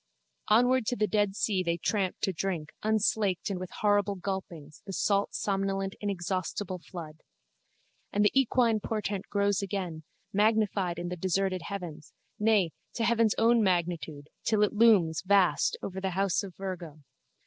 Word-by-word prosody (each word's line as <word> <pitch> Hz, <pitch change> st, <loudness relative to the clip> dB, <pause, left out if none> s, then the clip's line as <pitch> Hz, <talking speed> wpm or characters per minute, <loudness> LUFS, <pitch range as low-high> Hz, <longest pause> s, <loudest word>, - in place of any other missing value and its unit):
Onward 245 Hz, +2 st, +4 dB
to 245 Hz, -, +1 dB
the 215 Hz, -, +1 dB
dead 205 Hz, -2 st, +1 dB
sea 200 Hz, -3 st, +1 dB
they 170 Hz, -1 st, 0 dB
tramp 190 Hz, +1 st, 0 dB
to 190 Hz, -, 0 dB
drink, 165 Hz, -3 st, -3 dB
unslaked 210 Hz, -3 st, +1 dB
and 185 Hz, -, -3 dB
with 185 Hz, -1 st, -6 dB
horrible 205 Hz, -1 st, +2 dB
gulpings, 175 Hz, -6 st, -6 dB
the 195 Hz, -, -5 dB
salt 200 Hz, +1 st, +1 dB
somnolent 195 Hz, -1 st, -1 dB
inexhaustible 185 Hz, -1 st, -3 dB
flood. 160 Hz, -3 st, -9 dB, 0.9 s
And 205 Hz, +1 st, +2 dB
the 205 Hz, -, +4 dB
equine 245 Hz, -4 st, +3 dB
portent 205 Hz, -2 st, -3 dB
grows 200 Hz, -1 st, +1 dB
again, 185 Hz, -5 st, -4 dB, 0.3 s
magnified 205 Hz, -4 st, +2 dB
in 175 Hz, 0 st, -4 dB
the 180 Hz, -, -3 dB
deserted 185 Hz, +1 st, 0 dB
heavens, 175 Hz, -6 st, -7 dB, 0.3 s
nay 210 Hz, -5 st, +3 dB, 0.2 s
to 230 Hz, -, -1 dB
heaven's 230 Hz, -2 st, +3 dB
own 230 Hz, +1 st, +4 dB
magnitude, 170 Hz, -6 st, -1 dB
till 215 Hz, -2 st, +2 dB
it 210 Hz, -, +1 dB
looms, 205 Hz, -8 st, +4 dB
vast, 195 Hz, -2 st, +3 dB
over 190 Hz, 0 st, -5 dB
the 190 Hz, -, -1 dB
house 195 Hz, -2 st, +2 dB
of 195 Hz, -4 st, -9 dB
Virgo. 175 Hz, -6 st, -7 dB
195 Hz, 150 wpm, -29 LUFS, 180-210 Hz, 0.9 s, Onward